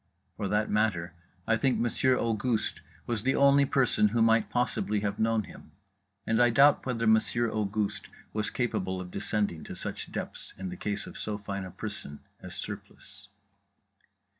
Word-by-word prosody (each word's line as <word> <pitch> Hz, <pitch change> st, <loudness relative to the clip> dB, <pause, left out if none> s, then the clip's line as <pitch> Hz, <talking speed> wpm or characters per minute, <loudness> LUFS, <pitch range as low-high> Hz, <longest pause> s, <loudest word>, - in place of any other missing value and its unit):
For 100 Hz, -, -2 dB
that 105 Hz, +2 st, 0 dB
matter, 100 Hz, -5 st, +1 dB, 0.3 s
I 115 Hz, -, +3 dB
think 135 Hz, +2 st, +2 dB
Monsieur 125 Hz, +2 st, +2 dB
Auguste 115 Hz, 0 st, -1 dB, 0.2 s
was 115 Hz, -3 st, -1 dB
the 135 Hz, +4 st, +1 dB
only 140 Hz, 0 st, +5 dB
person 125 Hz, -6 st, +3 dB
who 115 Hz, +2 st, 0 dB
might 115 Hz, 0 st, +4 dB
possibly 110 Hz, -4 st, 0 dB
have 100 Hz, -1 st, -2 dB
known 110 Hz, -1 st, +2 dB
him; -, -, -14 dB, 0.5 s
and 115 Hz, +1 st, +2 dB
I 120 Hz, -, +6 dB
doubt 140 Hz, +4 st, +5 dB
whether 115 Hz, -2 st, -1 dB
Monsieur 110 Hz, +1 st, +3 dB
Auguste 105 Hz, -1 st, -1 dB, 0.3 s
was 105 Hz, -1 st, -1 dB
capable 95 Hz, -7 st, -1 dB
of 90 Hz, -1 st, -7 dB
descending 100 Hz, -7 st, -1 dB
to -, -, -7 dB
such -, -, -5 dB
depths -, -, -5 dB
in 95 Hz, -1 st, -5 dB
the 90 Hz, -, -6 dB
case 105 Hz, +2 st, -3 dB
of -, -, -9 dB
so 105 Hz, -1 st, -2 dB
fine 100 Hz, -1 st, -5 dB
a -, -, -7 dB
person 100 Hz, -9 st, -7 dB, 0.2 s
as -, -, -8 dB
Surplice. 100 Hz, 0 st, -9 dB
110 Hz, 165 wpm, -29 LUFS, 100-120 Hz, 0.5 s, I